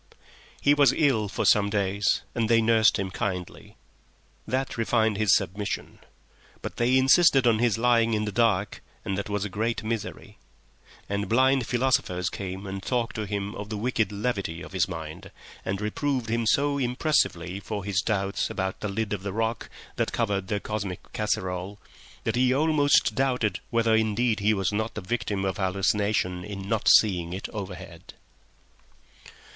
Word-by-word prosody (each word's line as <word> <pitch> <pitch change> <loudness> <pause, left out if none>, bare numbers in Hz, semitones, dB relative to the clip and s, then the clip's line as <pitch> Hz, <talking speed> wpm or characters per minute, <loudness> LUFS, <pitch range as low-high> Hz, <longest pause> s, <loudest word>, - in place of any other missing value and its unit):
He 145 - +4
was 145 -2 +5
ill 130 -9 +2
for - - -2
some 100 -1 +4
days 100 -1 0
and 115 -2 -1
they 115 -1 +5
nursed 110 -1 +4
him 95 -1 -3
kindly. 90 -2 -5 0.7
That 130 +1 -2
refined 110 -2 +1
his 105 -1 +4
submission. 100 +1 -3 0.6
But - - -6
they 125 +2 +3
insisted 135 0 +5
on 115 -2 +4
his 120 -2 +2
lying 115 -1 +3
in 105 0 -1
the 105 - -3
dark, 105 -3 +1 0.2
and 95 - -1
that 100 +2 -4
was 105 -1 -1
a - - -1
great 110 +4 -2
misery. 110 -1 -5 0.7
And 100 0 -2
blind 130 +1 +3
philosophers 120 -8 0
came 95 0 -6
and 95 0 -5
talked 115 +1 -2
to 110 -2 -3
him 100 0 -3
of 105 -1 -7
the 110 - -3
wicked 115 -1 0
levity 100 -5 -3
of - - -10
his 95 -3 +1
mind, 80 -4 -7 0.3
and 95 0 -2
reproved 115 +2 -2
him 115 -1 0
so 140 +3 +2
impressively 120 - 0
for 105 -1 -5
his 100 -1 0
doubts 100 -2 -1
about 95 -1 -3
the 105 - -3
lid 105 +1 -2
of 100 -2 -4
rock 110 +3 -2 0.3
that - - 0
covered 100 -5 -1
their 105 0 -1
cosmic 100 -4 -5
casserole 95 -2 -2 0.5
that - - -1
he 125 +1 +3
almost 145 -4 +3
doubted 125 -4 0
whether 115 -1 +2
indeed 110 +1 +1
he 105 +2 +2
was 95 0 -1
not 110 +2 -2
the 105 - -4
victim 100 -1 -2
of 95 -2 -2
hallucination 95 -1 0
in 100 -1 -7
not 110 0 -1
seeing 90 -5 +4
it 95 - -5
overhead. 95 -4 -8
105 Hz, 165 wpm, -26 LUFS, 95-115 Hz, 0.7 s, was